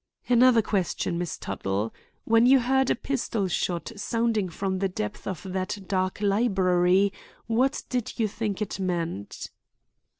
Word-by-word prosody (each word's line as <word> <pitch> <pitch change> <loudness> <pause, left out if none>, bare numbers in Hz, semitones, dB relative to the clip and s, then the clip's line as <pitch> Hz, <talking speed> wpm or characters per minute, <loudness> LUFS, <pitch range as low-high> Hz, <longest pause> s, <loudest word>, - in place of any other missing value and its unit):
"Another 245 -2 +5
question, 180 -3 -1
Miss 175 -3 -3
Tuttle. 100 +3 -3 0.3
When 230 +1 +4
you 270 +1 +7
heard 265 +1 +2
a - - +3
pistol 235 -6 -2
shot 175 0 -2
sounding 220 -2 0
from 190 +2 -2
the 195 0 0
depths 210 +2 -5
of 190 -2 -4
that 190 +2 -2
dark 185 0 -1
library, 195 -2 +3 0.3
what 250 +4 +1
did 250 -3 -3
you 220 - +3
think 210 0 -2
it 200 - -6
meant?" 170 - -3
200 Hz, 140 wpm, -26 LUFS, 185-230 Hz, 0.3 s, you